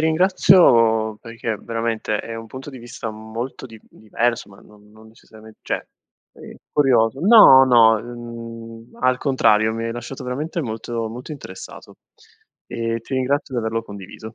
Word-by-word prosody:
ringrazio, 155 - +4
perché 115 -1 -5
veramente 115 -1 -3
è 115 - -8
un 115 0 -8
punto 130 +5 -10
di 135 - -9
vista 120 -2 -8
molto 110 +5 -7
di 115 -4 -12
diverso, 115 +1 -3
ma 100 - -17
non 105 0 -20
non 110 +1 -18
necessariament 110 -1 -17
cioè, - - -4 0.5
è - - -13 0.2
curioso 130 -3 +2
no, 185 - +8
no. 115 -3 +5
Mhmm, 115 -1 -10
al 130 0 +2
contrario, 110 -5 +2
mi 115 +1 -4
hai 115 - -3
lasciato 120 +2 -8
veramente 150 +7 -4
molto, 115 -2 -4
molto 125 +7 -8
interessato 95 -10 -11 0.7
e 115 0 -3
ti 115 - -7
ringrazio 130 +1 -1
di 120 - 0
averlo 115 +1 -2
condiviso. 105 +1 -11
115 Hz, 150 wpm, -21 LUFS, 110-130 Hz, 0.7 s, no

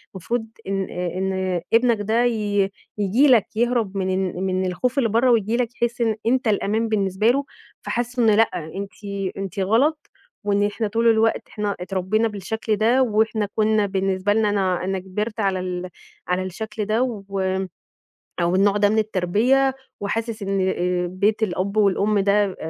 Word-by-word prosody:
المفروض 225 +5 -3 0.2
إن 195 -1 -1
آآ، 180 0 -3
إن 190 -2 -1
ابنك 230 -2 +4
ده 225 +4 +1
ي 205 -4 +1 0.3
ييجي 210 +8 +3
لك 245 -6 +5
يهرب 230 -4 0
من 190 -1 -1 0.3
ال 185 - -3
من 185 0 0
الخوف 240 +9 -1
اللي 245 -5 +2
بره 235 +4 +3
وييجي 225 0 +2
لك 245 -1 +1
يحس 240 0 0
إن 225 -2 +2
أنت 250 +1 +1
الأمان 215 +2 +1
بالنسبة 200 -1 0
له، 275 +2 -1 0.4
فحَسوا 245 +1 -2
إن 225 - +5
لأ 225 +2 +4 0.3
أنتِ 200 0 -5 0.5
أنتِ 195 -1 -5
غلط 235 +11 +2 0.5
وإن 205 0 +1
إحنا 210 +1 -2
طول 230 +3 +1
الوقت 225 0 +3
إحنا 210 -2 -2
اتربينا 190 +4 0
بالشكل 215 +2 -2
ده 230 +5 +3
وإحنا 220 -2 +1
كنّا 215 -1 +2
بالنسبة 195 0 0
لنا 215 -1 +2
أنا 190 -3 0
أنا 190 0 -1
كبرت 210 +4 -4
على 195 -2 +1
ال 180 0 -4 0.4
على 180 +1 0
الشكل 215 +3 -5
ده 215 +3 +1
و 200 -6 -4 1.0
أو 170 +1 +1
النوع 200 +1 +3
ده 205 0 +4
من 215 +2 +1
التربية، 220 +7 +2 0.3
وحاسس 220 +2 -3
إن 195 0 -1
آآ 180 -1 0
بيت 205 +5 0
الأب 195 +1 -3
والأم 205 0 +3
ده 200 -1 +2
205 Hz, 165 wpm, -22 LUFS, 190-225 Hz, 1.0 s, لك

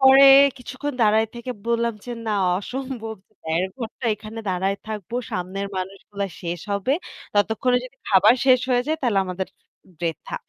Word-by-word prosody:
পরে 265 0 +8 0.3
কিছুক্ষণ 260 +3 -5
দাঁড়ায় 220 +1 +4
থেকে 240 +1 -6 0.2
বললাম 235 0 +1
যে 245 - -7 0.2
না 215 - 0 0.3
অসম্ভব। 245 0 -5 0.3
১.৫ 165 +3 0
ঘণ্টা 230 +1 -6
এখানে 215 +1 -9
দাঁড়ায় 190 +2 0
থাকবো, 215 0 -6 0.2
সামনের 185 +2 -3
মানুষগুলা 195 +2 -4 0.2
শেষ 170 -1 -3
হবে। 200 +6 0 0.4
ততক্ষণে 220 +5 +2
যদি 255 +2 -12
খাবার 205 +4 +6
শেষ 255 -1 +6
হয়ে 245 -1 +3
যায় 315 +1 +1
তাহলে 225 -6 +2
আমাদের 185 +1 -3 0.5
বৃথা। 170 - -4
220 Hz, 150 wpm, -23 LUFS, 190-250 Hz, 0.5 s, পরে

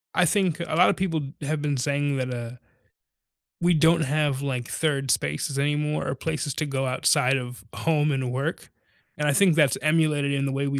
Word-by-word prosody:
I 180 - +4
think 175 -1 +1
a 165 -2 -3
lotta 180 +3 +5
people 165 -5 -1 0.2
have 150 +1 -2
been 145 -2 -1
saying 140 +2 0
that, 130 -1 -2
uh 120 0 -6 1.1
we 175 0 +3
don't 165 +2 +4
have, 145 -2 0
like, 130 -4 -3
3rd 140 -4 -1
spaces 75 - -1
anymore, 150 +1 0
or - - -1
places 155 0 -3
to 155 - -1
go 135 -2 -2
outside 130 +1 +2
of 125 -4 -7
home 150 -2 +1
and 130 -2 -2
work. 140 +6 -3 0.5
And 150 0 0
I 145 - +3
think 185 0 +4
that's 150 -7 +3
emulated 155 -2 +2
in 140 0 0
the 135 - -1
way 140 +1 -1
we 140 0 -1
145 Hz, 195 wpm, -25 LUFS, 135-155 Hz, 1.1 s, lotta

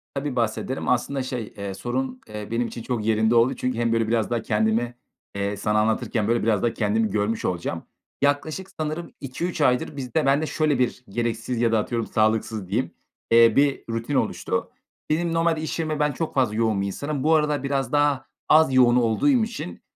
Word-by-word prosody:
Tabii, 140 -1 -3
bahsederim. 120 +3 -1
Aslında, 130 +2 0
şey, 125 -4 -5
eee, 100 -1 -4
sorun, 130 +5 -3
eee, 105 -1 -7
benim 115 +1 0
için 115 - -7
çok 115 -3 -3
yerinde 110 +1 +2
oldu 120 +3 +4
çünkü 125 -2 -2
hem 115 -1 +1
böyle 115 -1 +1
biraz 115 -1 +1
daha 120 -1 0
kendimi, 110 +2 0 0.4
eee, 100 0 -2
sana 105 +2 +1
anlatırken, 110 0 0
böyle, 115 -1 +1
biraz 110 -4 +1
daha 120 - +1
kendimi 110 0 +1
görmüş 105 +2 -1
olacağım. 85 -2 -2 0.4
Yaklaşık 150 +6 0
sanırım 155 +2 -3
2-3 155 +5 -3
aydır 130 +2 +1
bizde 135 +3 -1
bende 140 +3 +3
şöyle 155 -3 0
bir 125 0 0
gereksiz 115 +2 -2
ya 115 -1 +3
da 110 - +3
atıyorum 115 +1 -2
sağlıksız 110 -2 0
diyeyim, 95 - -1 0.4
eee, 115 -1 +6
bir 140 -1 +2
rutin 115 +5 -2
oluştu. - - -1 0.4
Benim 165 +2 0
normalde 165 -1 +1
iş 160 - -3
yerime 155 -2 -1
ben 150 0 +2
çok 160 +4 -4
fazla 125 -6 +2
yoğun 110 -3 +1
bir 100 - -1
insanım. 140 +7 -3
Bu 160 +2 +4
aralar 150 -2 +1
biraz 135 -2 -1
daha 145 -2 +2 0.2
az 155 -3 +5
yoğun 125 -2 +5
olduğum 120 - +2
için 210 - -6
120 Hz, 190 wpm, -24 LUFS, 110-145 Hz, 0.4 s, eee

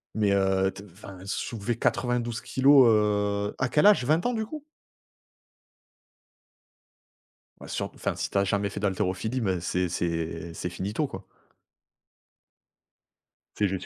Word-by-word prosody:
Mais, 105 -2 +2
heu, 95 -1 +2
t 95 +1 -11
enfin 95 +1 -12
soulever 115 +3 -3
92 120 -1 0
kilogrammes, 135 -3 +5 0.6
heu, - - -7
à 130 - 0
quel 150 - +4
âge? 200 -12 +5
20 155 +5 +2
ans, 245 - 0
du 220 -1 -1
coup? 305 +5 -8 3.0
Bah, - - -11
surt - - -3
enfin, - - -2
si - - -3
tu - - -2
as 100 - +4
jamais 100 +1 0
fait - - -6
d'haltérophilie, 100 +4 -1
ben, 95 -4 0
c'est 90 +1 0
c'est 85 0 -3
c'est 90 +2 -4
finito, 100 - -2
quoi. 95 -5 -9 2.3
C'est 105 - +2
juste 95 -1 -4
100 Hz, 140 wpm, -27 LUFS, 95-125 Hz, 3.0 s, kilogrammes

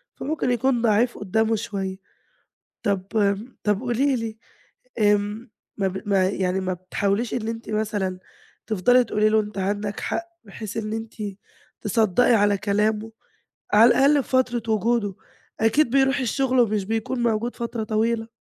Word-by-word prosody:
فممكن 300 -4 -2
يكون 245 0 +1
ضعيف 230 +2 +2
قدامه 220 +3 +1
شوية. 195 -2 -4 0.9
طب 195 -3 -1
امم 205 +3 0
طب 210 0 +1
قولي 260 +2 +1
لي، 225 -2 -5 0.6
امم، 210 +2 +1 0.3
ما 195 -2 +1
ب 190 +2 -6
ما 190 -2 +3
يعني 190 -1 -1
ما 185 -1 -2
بتحاوليش 200 +5 -2
إن 225 -3 -2
أنتِ 230 +1 -5
مثلًا 205 -4 -2 0.5
تفضلي 235 +4 +4
تقولي 215 -2 +1
له 220 - +4
أنتِ 210 -1 -4
عندك 205 +1 -2
حق 340 - -2 0.2
بحيث 210 0 -7
إن 215 -1 -3
أنتِ 225 0 -5 0.7
تصدَّقي 220 +2 +3
على 205 -2 +3
كلامه 210 +2 0 0.6
على 220 +3 +7
الأقل 280 +3 +4
في - - -17
فترة 250 -3 +1
وجوده. 215 -1 +1 0.5
أكيد 230 +5 +3
بيروح 270 +1 +3
الشغل 260 +1 +1
ومش 215 -4 +1
بيكون 225 +4 -2
موجود 235 +1 0
فترة 235 -2 -3
طويلة. 225 +1 0
220 Hz, 145 wpm, -23 LUFS, 205-235 Hz, 0.9 s, على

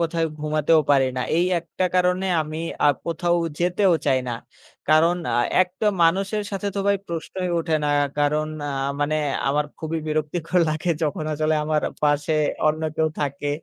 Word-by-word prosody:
কোথাও 165 0 0 0.2
ঘুমাতেও 155 +1 +3
পারি 135 -2 +4
না। - - -1 0.2
এই 170 - +3
একটা 170 +2 -3
কারণে 180 +1 +2 0.2
আমি 155 +1 -6 0.3
আ - - +6 0.2
কোথাও 170 +1 0 0.2
যেতেও 180 +2 +2
চাই 130 -2 +4
না। - - -2 0.6
কারণ 165 +3 +4 0.2
আ - - +2 0.2
একটা 185 +4 -4 0.2
মানুষের 195 +5 +2
সাথে 200 0 -3
তো - - -2
ভাই 200 - +4
প্রশ্নই 175 +2 -4
ওঠে 165 -1 -1
না। 150 - +1 0.3
কারণ 150 +1 +1 0.2
আ - - -2 0.3
মানে 145 +1 +1 0.3
আমার 150 +2 +1
খুবই 160 +1 -3
বিরক্তিকর 155 +3 -1
লাগে 155 +3 -1
যখন 155 0 -1
আসলে 155 +1 +1
আমার 155 0 0 0.2
পাশে 145 +1 +2 0.3
অন্য 155 +1 +1
কেউ 160 0 +2
থাকে। 145 0 -2
160 Hz, 165 wpm, -23 LUFS, 150-175 Hz, 0.6 s, আ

